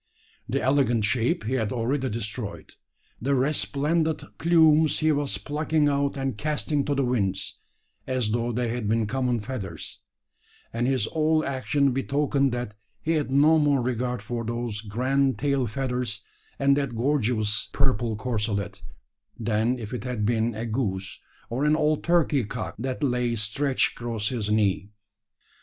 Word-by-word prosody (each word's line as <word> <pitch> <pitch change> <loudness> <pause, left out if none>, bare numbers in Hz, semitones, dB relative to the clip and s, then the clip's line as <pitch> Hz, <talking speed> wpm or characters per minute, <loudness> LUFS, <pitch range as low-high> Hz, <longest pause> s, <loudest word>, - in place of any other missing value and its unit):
The - - +1
elegant 130 -5 +3
shape 115 0 +1
he 115 +4 -2
had 110 -5 0
already 130 +3 0
destroyed; 110 -1 -5 0.5
the 140 +4 +1
resplendent 150 +3 +1 0.2
plumes 160 -2 +5
he 155 0 +3
was 145 -8 0
plucking 150 +6 0
out 140 0 0
and 135 -3 -2
casting 150 -1 0
to 145 - 0
the 135 -1 +1
winds, 95 -6 -1 0.5
as 130 -5 0
though 120 +1 0
they 120 0 -1
had 115 -2 -2
been 110 +1 +2
common 125 0 0
feathers; 110 -4 -6 0.7
and 120 +2 0
his 130 -5 +2
whole 155 +2 +1
action 140 +1 +1
betokened 140 +1 +1
that 120 -3 -3 0.3
he 160 - 0
had 155 -4 +1
no 150 +4 +5
more 145 -4 +3
regard 125 0 -2
for 120 -1 -3
those 115 -2 -3
grand 130 +5 +1
tail 140 -3 +1
feathers 125 -3 -2 0.3
and 140 0 +4
that 140 -4 -1
gorgeous 115 -4 0
purple 120 -5 +1
corselet, 105 -3 -2 0.6
than 115 +2 +1
if 110 -1 -7
it 125 - -4
had 125 -5 -2
been 115 0 +1
a 110 +2 -3
goose, 100 -5 -2 0.3
or 125 +4 -2
an 150 +1 +4
old 155 -1 +1
turkey 165 -6 +3
cock 105 -4 -5
that 130 +4 -3
lay 125 -3 +1
stretched 120 +6 +1
across 115 -3 -2
his 115 -5 -2
knee. 105 -2 +1
125 Hz, 150 wpm, -26 LUFS, 110-140 Hz, 0.7 s, plumes